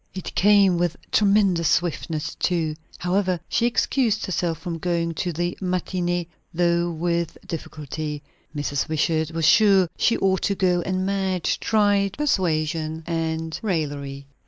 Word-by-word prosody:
It 185 - -6
came 200 -3 +4
with 175 -2 0
tremendous 195 -5 +3
swiftness, 160 -2 -1
too. 165 -4 0 0.2
However, 185 0 0
she 235 - +1
excused 235 -2 +1
herself 175 -3 -1
from 165 0 -5
going 170 -1 -1
to 175 +3 -2
the 175 +2 -2
matinée, 180 -1 -1 0.3
though 170 0 +2
with 170 0 -2
difficulty. 150 -2 -5 0.3
Mrs. 145 -1 -1
Wishart 160 0 +1
was 165 -1 -1
sure 195 -1 +5
she 230 - +3
ought 190 -1 +1
to 200 - 0
go; 180 -2 +2
and 185 +1 -1
Madge 190 -3 0
tried 205 -3 +2
persuasion 160 - -1
and 160 -1 -2
raillery. 145 -8 -3
175 Hz, 135 wpm, -23 LUFS, 160-190 Hz, 0.3 s, sure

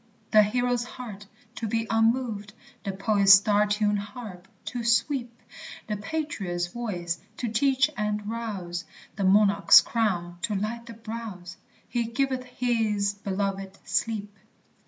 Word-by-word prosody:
The 215 - +8
hero's 245 +3 +1
heart, 220 -5 -9 0.3
to 230 - -3
be 225 +1 0
unmoved, 225 -2 +1 0.3
The 200 - -2
poet's 195 0 +5
star 205 +1 +5
tuned 210 0 +1
harp, 205 -3 -9 0.2
to 245 -2 -4
sweep, 240 +2 +1 0.6
The 210 - -2
patriot's 210 - -3
voice, 175 -5 -4 0.2
to 240 - -2
teach 265 +4 +3
and 210 0 -2
rouse, 200 -6 -4 0.3
The 200 - -2
monarch's 200 +1 +7
crown, 175 -7 -1
to 210 +3 -1
light 230 +4 -3
the 230 - -8
brows? 215 -6 -7 0.3
"He 240 -1 -1
giveth 255 +2 -1
his 225 -5 0
belovèd 195 -1 -3
sleep." 210 -2 -1
210 Hz, 130 wpm, -27 LUFS, 200-235 Hz, 0.6 s, The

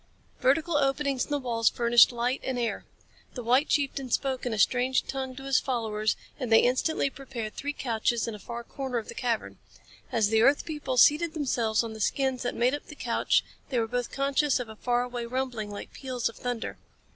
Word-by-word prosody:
Vertical 310 +4 +2
openings 275 -1 +1
in - - -19
the 290 - +1
walls 235 -4 +1
furnished 235 0 +5
light 245 +2 -1
and 260 -1 -2
air. 235 -2 -2 0.5
The 245 - -5
white 255 +6 +3
chieftain 275 -2 0
spoke 260 0 -1
in - - -1
a 220 - -2
strange 255 +5 +2
tongue 265 -1 -4
to 270 - -9
his 275 -1 +3
followers, 220 -4 -1 0.2
and 250 -4 -3
they 225 - +8
instantly 270 +3 +1
prepared 250 -6 -6
three 285 - -3
couches 235 -4 -1
in 230 - -3
a 210 - -8
far 235 +4 -7
corner 265 0 -4
of 225 - -4
the - - -6
cavern. 235 -3 -2 0.5
As 220 -3 +2
the 220 0 +3
earth 275 +5 +4
people 295 -5 -3
seated 310 +5 +5
themselves 235 -7 +1
on 225 -1 -5
the 220 - -9
skins 265 +3 0
that 245 - -2
made 245 +3 +2
up 290 - -5
the 300 - -10
couch - - +1 0.2
they 255 - -1
were 230 - +2
both 245 +1 -2
conscious 275 0 +1
of 245 -3 -5
a 220 - -9
far 245 +2 0
away 245 -1 -5
rumbling 245 -4 -3
like 205 0 -8
peals 255 -3 -2
of - - -12
thunder. 245 -2 -4
250 Hz, 210 wpm, -28 LUFS, 235-275 Hz, 0.5 s, they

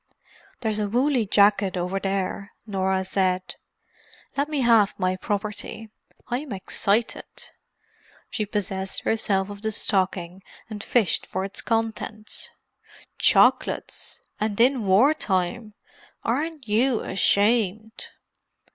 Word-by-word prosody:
"There's 220 -3 0
a 205 -1 -1
woolly 250 0 +2
jacket 200 -1 +4
over 180 +2 -1
there," 195 +1 -2
Norah 190 -2 0
said. 185 -1 0 0.8
"Let 280 +2 0
me 295 -3 0
have 230 -4 +4
my 185 -1 +1
property—I'm 220 +6 -5
excited." 200 +3 -1 0.8
She 215 - -2
possessed 195 -2 -2
herself 205 -3 +1
of 200 0 -9
the 220 0 -1
stocking 185 -3 0 0.3
and 210 -1 -6
fished 230 -7 +1
for 190 +1 -2
its 195 - -2
contents. 225 -1 -2 0.7
"Chocolates!—and 210 -1 +1
in 245 -3 +3
war 220 +11 +6
time! 210 - -2 0.5
Aren't 290 +2 -2
you 230 +3 +2
ashamed?" 215 +2 +1
210 Hz, 100 wpm, -25 LUFS, 190-230 Hz, 0.8 s, war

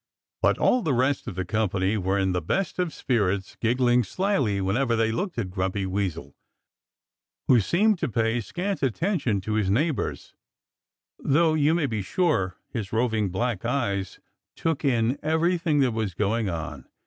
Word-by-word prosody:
But - - +3
all 250 - +3
the 150 - 0
rest 130 +3 +1
of - - -5
the 95 0 -2
company 100 -1 0
were 95 -1 0
in 95 -1 +1
the 90 -1 -1
best 185 - -2
of 180 -3 0
spirits, 100 -9 -1
giggling 120 +1 +3
slyly 160 - 0
whenever 115 +6 +1
they 115 0 +1
looked 180 - -3
at 100 -6 -2
Grumpy 95 +1 -1
Weasel, 95 -3 -3 1.1
who 125 - +6
seemed 195 - +2
to - - -1
pay 115 +1 0
scant 190 - -3
heed 135 - 0
to 110 - -2
his 105 -3 +1
neighbors, 145 +8 -1 0.9
though 160 +3 +3
you 155 +1 +3
may 170 -4 +1
be 110 -6 -2
sure 95 - 0
his 105 -6 -5
roving 110 -3 +1
black 110 +2 -2
eyes 110 -7 -2 0.4
took 165 -2 -1
in 120 -2 +1
everything 160 -1 +1
that 130 -2 +3
was 110 -5 -3
going 105 +1 0
on. 80 -3 -5
115 Hz, 160 wpm, -25 LUFS, 100-150 Hz, 1.1 s, who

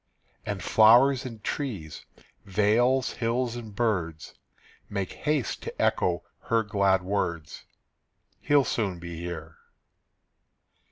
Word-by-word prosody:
And 100 -3 -3
flowers 120 +5 +5
and 115 -4 -10
trees, 100 - -5 0.4
vales, 115 +7 +2
hills, 120 +1 -1
and 110 -4 -8
birds 90 -10 -1 0.6
Make 100 -3 -3
haste 145 -7 -1
to - - -8
echo 85 -1 +1 0.2
her 115 -1 +2
glad 100 -3 +2
words, 85 -5 -3 0.7
"He'll 145 -2 +3
soon 100 -6 -1
be 85 -1 -8
here." 85 -2 -7
105 Hz, 105 wpm, -27 LUFS, 90-120 Hz, 0.7 s, flowers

